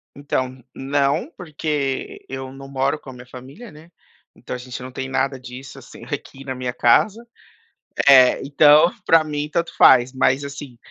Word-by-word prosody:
Então, 130 -2 -4
não. 140 - -1
Porque 150 -5 -4
eu 130 0 -7
não 135 0 -11
moro 135 +2 -1
com 135 - -13
a - - -9
minha 125 0 -13
família, 135 - -12
né. 155 +3 -17 0.4
Então - - -7
a - - -7
gente 125 0 -8
não 130 +1 -8
tem 130 +1 -6
nada 135 0 -1
disso, 125 +2 -11
assim, - - -14
aqui 135 - -7
na 130 -1 -5
minha 125 -1 -4
casa. 215 - +2 0.8
É, 130 -2 +6
então 150 +4 +5
para 165 -1 +5
mim 150 -1 -4
tanto 170 +2 -3
faz, 125 0 +5
mas 130 +1 +1
assim 140 -3 -9
135 Hz, 170 wpm, -21 LUFS, 130-150 Hz, 0.8 s, É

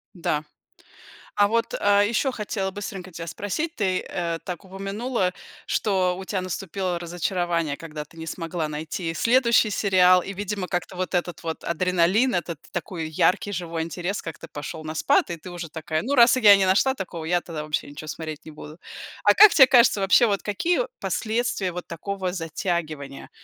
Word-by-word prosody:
Да. 155 -3 -1 0.9
А 205 0 +4
вот, 230 +2 0
а, 205 0 +4
еще 235 +5 +1
хотела 205 -4 -3
быстренько 190 -2 -7
тебя 165 0 -7
спросить. 305 - -3
Ты, 190 -3 0
э, 170 -2 -2
так 180 0 -6
упомянула, 195 +2 -2 0.4
что 185 -4 +1
у 190 - -7
тя 190 -1 -2
наступило 185 0 -3
разочарование, 170 -3 -1
когда 155 -2 -7
ты 160 +3 -21
не 160 - -7
смогла 165 -1 -3
найти 160 +3 -4
следующий 235 +3 +3
сериал 185 -3 +4
и, 195 - -6
видимо, 200 -1 -4
как-то 180 0 -3
вот 185 +1 -3
этот 175 -1 -2
вот 160 -1 -4
адреналин, 180 +7 +2
этот 170 -3 -2
такой 165 -1 -4
яркий 195 +6 +1
живой 170 -3 -3
интерес 175 +4 -4
как-то 165 - -8
пошел 150 +2 -7
на 155 +1 -6
спад, - - +2
и 170 - -4
ты 180 +3 -10
уже 175 -2 -6
такая: 160 0 -3
"Ну, 275 +8 -1
раз 235 -1 +7
я 210 -5 +8
не 195 - +2
нашла 210 +9 +3
такого, 175 -5 -6
я 175 +2 +1
тогда 160 -4 -6
вообще 150 -1 -3
ничё 155 +2 -9
смотреть 155 -1 -6
не 155 - -9
буду". 150 +1 -11 0.5
А - - +6
как 425 -3 +9
тебе 265 -3 +8
кажется, 235 -5 +5
вообще 195 +5 +5
вот 200 -3 0
какие 330 - 0 0.2
последствия 220 -5 -1
вот 180 +1 -6
такого 185 +2 -4
затягивания? 160 -4 -4
180 Hz, 175 wpm, -24 LUFS, 165-205 Hz, 0.9 s, как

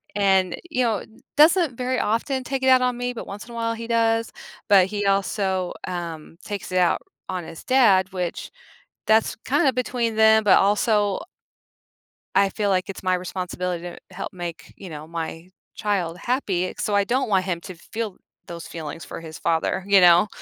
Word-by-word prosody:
And, 190 -3 +2
you 255 -4 +1
know, 220 -5 0 0.3
doesn't 315 -4 +5
very 255 0 -1
often 255 +5 0
take 265 0 -3
it - - +2
out 255 -1 +6
on 250 -1 0
me, 245 0 -2
but 230 - -7
once 200 +2 -7
in 240 - -13
a - - -9
while, 230 0 -1
he 230 0 -7
does. 230 -1 +2 0.4
But 195 -2 +6
he 205 0 -3
also, 195 -2 0 0.2
um, 165 -3 -6
takes 200 -3 -6
it - - +1
out 175 - +2 0.3
on 180 -3 -3
his 165 - -10
dad, 205 -8 +4
which 180 -2 -4 0.6
that's 220 0 +3
kinda 275 0 +3
between 240 -3 -1
them, 220 0 +6
but, 200 - +6
also 205 0 +2 1.2
I 195 0 +4
feel 205 0 -1
like 185 +1 0
it's 190 - -7
my 185 0 +2
responsibility 180 -1 -4
to 175 - -7 0.2
help 195 - -5
make, 170 -5 -7
you 190 - -9
know, 155 0 -8
my 165 +1 -6 0.3
child 185 -5 -1
happy. 195 -6 -1
So, 205 - 0
I 200 - +4
don't 250 +2 0
want 190 -2 +2
him 175 -3 -2
to 185 -2 -9
feel 215 +3 -6 0.3
those 170 -1 -8
feelings 160 0 -7
for - - -7
his 160 -1 -9
father. 170 +2 0
You 200 -2 +6
know? 175 +3 +7
200 Hz, 185 wpm, -23 LUFS, 180-230 Hz, 1.2 s, know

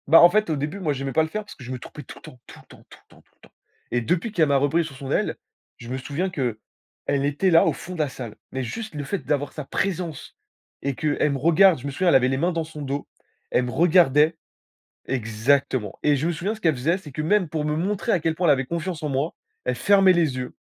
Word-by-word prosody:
Bah, 160 +4 +8
en 175 - +9
fait, 215 +2 +1
au 155 - +1
début, 150 +7 -4
moi, 155 -6 0
j'aimais 135 0 -4
pas 160 - +4
le 160 - -3
faire 215 +5 -4
parce 205 - -12
que 130 - -13
je 125 - -7
me 130 - -4
trompais 150 - -10
tout - - -11
le - - -15
temps, 125 - -12
tout - - -13
le - - -18
temps, - - -16
tout - - -14
le - - -22
temps, - - -20
tout - - -37
le - - -43
temps - - -37 0.4
et 120 - +3
depuis 175 - -1
qu'elle 165 -7 +2
m'a 140 - +2
repris 145 +5 +2
sous 155 - -9
son 135 0 -7
aile, - - 0 0.4
je 115 - -10
me 130 - -2
souviens 145 +8 -3
qu'elle 130 - -2 0.7
était 145 +6 +1
là, 165 - +6
au - - +2
fond 185 - -8
de 175 - -8
la 155 - +2
salle, 125 -4 -8 0.2
mais 130 0 -2
juste 220 - -6
le 145 - -3
fait 195 +6 -4
d'avoir 145 0 -1
sa 150 - -7
présence 175 -2 -3 0.4
et 140 -1 -2
qu'elle 150 0 0
me - - -1
regarde. 170 +5 +5
Je - - -9
me 140 - -3
souviens, 180 +7 -1
elle 170 - +5
avait 130 -1 +4
les 135 - 0
mains 170 +5 +1
dans 165 -1 -1
son 155 -1 -9
dos. 140 0 -3 0.5
Elle 125 - +2
me 125 - -4
regardait 160 -2 +4 0.7
exactement 120 -1 0
et 150 -1 +4
je 145 +4 -1
me - - +1
souviens 175 +6 -2
ce 220 - -12
qu'elle 160 -6 +2
faisait, 155 +8 +1
c'est 160 -6 -11
que, 155 - -4
même, 185 +1 +2
pour 150 -1 -2
me 150 0 0
montrer 200 +7 -1
à 185 - +3
quel 160 0 -1
point 175 +1 0
elle 150 - +7
avait 135 -1 -1
confiance 170 0 -3
en 150 - -1
moi, 140 +4 -1 0.3
elle 125 - +1
fermait 195 +7 +5
les 160 -7 +1
yeux 125 0 -5
150 Hz, 280 wpm, -24 LUFS, 135-175 Hz, 0.7 s, en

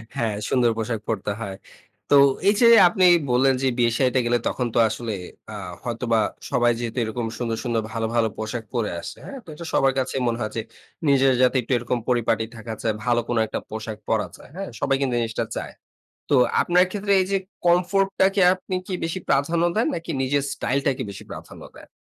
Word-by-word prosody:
হ্যাঁ, 110 -3 -1
সুন্দর 120 -3 +3
পোশাক 115 0 -2
পরতে 105 -2 -2
হয়। 100 -3 -5 0.5
তো - - +6 0.3
এই - - +5
যে 235 - +7 0.2
আপনি 185 +1 +2 0.3
বললেন 130 +2 +4
যে, 135 - +2
বিয়ে 120 -1 +3
শাদিতে 130 -1 +2
গেলে 120 +1 +2
তখন 125 - -1
তো - - +4
আসলে 115 -2 -4 0.4
আ - - -6 0.3
হয়তোবা 115 -1 0 0.3
সবাই 120 -3 +3
যেহেতু 120 0 -4
এরকম 115 +2 -3
সুন্দর, 115 -2 -2
সুন্দর 120 -3 0
ভালো, 115 0 -2
ভালো 115 -1 +3
পোশাক 110 +2 -4
পরে 115 -4 -1
আসে - - -8
হ্যাঁ? 275 - -7
তো - - -33
এটা 170 - -8
সবার 135 -1 +3
কাছে 130 +1 -2
মনে 115 -1 0
হয় 110 - -2
যে, 115 - -1 0.5
নিজের 135 -1 +4
যাতে 125 +1 +4
একটু 120 - -8
এরকম 120 +1 -2
পরিপাটি 120 -2 +1
থাকা 115 0 -7
চাই, 110 - 0
ভালো 120 -1 +3
কোন 120 - 0
একটা - - -3
পোশাক 110 0 -6
পরা 110 -2 +1
যায়, - - -16
হ্যাঁ? 195 +1 -5
সবাই 135 -1 +1
কিন্তু 130 -3 0
এই - - +1
জিনিসটা 115 -1 -2
চায়। - - -5 0.6
তো - - +4 0.3
আপনার 180 +1 +4
ক্ষেত্রে 200 0 -2
এই - - 0
যে, 195 - +3 0.3
কমফোর্টটাকে 195 +2 +2
আপনি 185 0 -5
কি 190 - -4
বেশি 165 +3 -2
প্রাধান্য 155 +5 +2
দেন, 225 - +2
নাকি 165 0 -5
নিজের 135 +2 +1
স্টাইলটাকে 135 0 -1
বেশি 100 - -10
প্রাধান্য - - -10
দেন? - - -14
125 Hz, 200 wpm, -23 LUFS, 115-150 Hz, 0.6 s, যে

